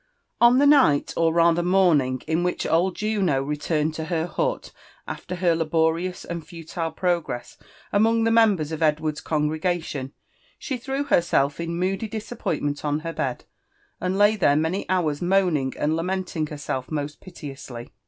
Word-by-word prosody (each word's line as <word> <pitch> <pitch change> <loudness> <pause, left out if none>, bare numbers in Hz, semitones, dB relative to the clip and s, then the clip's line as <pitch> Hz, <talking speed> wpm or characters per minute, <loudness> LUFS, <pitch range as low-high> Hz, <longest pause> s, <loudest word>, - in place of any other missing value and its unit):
On 240 +1 +7
the 285 - +5
night, 275 - +4
or 165 -1 +2
rather 170 +1 +3
morning, 170 -9 +2
in. 160 +2 0
which 180 0 -1
old 175 +3 +2
Juno 195 -10 0
returned 150 +2 -1
to 160 0 -4
her 165 -1 -1
hut - - -2 0.4
after 180 - -5
her 175 -2 +2
laborious 165 +2 0
and 170 -1 -5
futile 165 0 -5
progress 170 -7 -2 0.4
among 225 +2 +3
the 225 - +2
members 205 -9 +3
of 160 0 -4
Edward 155 0 +2
6 - - -6
congregation, 155 -2 -1 0.5
she 265 -3 -4
threw 270 +3 -3
herself 150 - +2
in 170 0 -3
moody 190 +4 -1
disappointment 200 -9 -3
on 150 0 -1
her 165 +1 -5
bed, 130 -5 -3 0.6
and 185 +1 -1
lay 205 +1 +5
there 170 -8 +3
many 160 +6 -1
hours 165 -6 0
moaning 175 -7 +1
and 155 +2 0
lamenting 180 -2 -2
herself 145 -4 -4
most 150 -1 -4
piteously. 135 -8 -9
165 Hz, 155 wpm, -24 LUFS, 150-185 Hz, 0.6 s, On